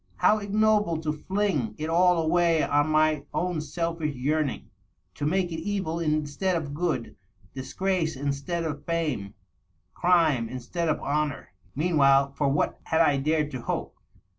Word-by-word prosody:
How 215 - +3
ignoble 210 -4 +2
to 155 -1 -1
fling 155 - -1
it 155 - -3
all 175 +2 +4
away 165 0 +2
on 145 +1 +2
my 155 -1 +2
own 175 -3 -1
selfish 165 -1 -3
yearning! 145 +2 -1 0.2
— - - -46
^to 145 - -2
make 180 +1 0
it 160 - -3
evil 185 -2 -2
instead 155 +3 0
of 150 -4 -3
good, 155 -7 -2 0.4
disgrace 165 +4 -1
instead 140 +5 -2
of 145 -3 -4
fame, 150 -12 -2 0.7
(rime 160 -10 +3
in 130 - -5
stead 165 +7 -3
of 155 - 0
honor! 145 -6 -2
•. 95 +1 -40
Meanwhile, 140 -3 +3
for 140 0 0
what 140 - 0
had 160 0 +2
I 145 -4 +4
dared 150 +1 0
to 130 -3 -5
hope? - - -4
155 Hz, 160 wpm, -26 LUFS, 145-170 Hz, 0.7 s, all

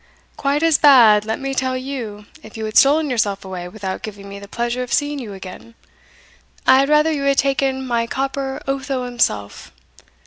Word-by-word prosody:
"Quite 285 +2 -1
as 325 -2 +4
bad, 230 -8 +6
let 220 0 -3
me 270 0 -3
tell 260 -1 -1
you, 245 -6 -6 0.2
if 215 - -12
you 220 - -4
had 215 +1 -6
stolen 295 +1 +4
yourself 205 -5 -1
away 180 -2 -6
without 190 0 -6
giving 200 -2 -9
me 200 0 -9
the 200 - -11
pleasure 240 +3 -3
of 250 - -6
seeing 290 -1 0
you 220 -6 -7
again. 195 +4 -11 0.9
I 260 0 +6
had 275 +1 +1
rather 300 +1 +4
you 295 -3 -2
had 275 0 +1
taken 270 -1 0
my 235 -2 -1
copper 270 +1 -3
Otho 270 -1 -3
himself. 105 - -2
250 Hz, 185 wpm, -19 LUFS, 210-275 Hz, 0.9 s, bad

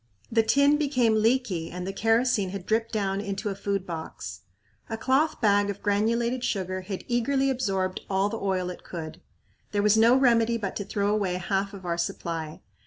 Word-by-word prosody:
The 225 0 +4
tin 280 +6 +4
became 260 -6 +2
leaky 220 -8 +1
and 180 0 -6
the 195 - -4
kerosene 225 -2 +2
had 190 -1 -6
dripped 225 +2 0
down 200 -2 -1
into 200 +1 -3
a 195 - -3
food 200 -1 -2
box. 160 - -7 0.5
A 225 - -3
cloth 265 +7 +1
bag 205 -2 +3
of 200 0 -5
granulated 235 +4 +1
sugar 185 -4 -2
had 185 0 -6
eagerly 270 +3 +1
absorbed 195 -7 -1
all 195 +1 +2
the 225 +2 -4
oil 185 -2 -1
it 180 - -11
could. 160 -3 -7 0.5
There 205 0 +1
was 210 +1 +4
no 230 +3 +6
remedy 235 -3 +3
but 200 -4 -4
to 200 - -3
throw 205 0 0
away 195 -4 0
half 195 +2 -1
of 190 -2 -11
our 170 -1 -1
supply. 165 -2 -4
205 Hz, 185 wpm, -26 LUFS, 190-230 Hz, 0.5 s, no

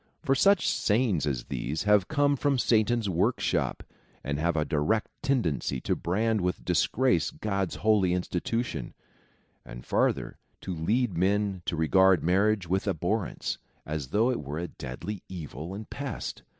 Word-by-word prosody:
For 135 - +3
such 195 +7 +4
sayings 105 - +1
as 65 -4 -1
these 75 +6 -3
have 105 -2 +4
come 145 -2 +2
from 140 0 +1
Satan's 115 -1 +2
workshop, 90 -3 0 0.4
and 70 +1 -2
have 85 +1 +1
a 75 - +1
direct 80 +9 0
tendency 110 - 0
to - - 0
brand 110 +4 0
with 90 +1 -2
disgrace 90 - +2
God's 100 -3 -2
holy 105 -4 +3
institution; 90 +7 -2 0.7
and - - -10
farther, - - 0 0.2
to 95 - -4
lead 100 +6 0
men 100 0 +1
to - - 0
regard 95 +3 +4
marriage 100 +2 +2
with 95 +4 0
abhorrence, 95 +3 -1 0.3
as 75 -3 -4
though 110 - +2
it 125 - -2
were 75 +1 -5
a 85 +1 -3
deadly 90 +11 -6
evil 85 0 -6
and 110 +1 -7
pest. 140 -5 -5
95 Hz, 150 wpm, -28 LUFS, 80-110 Hz, 0.7 s, such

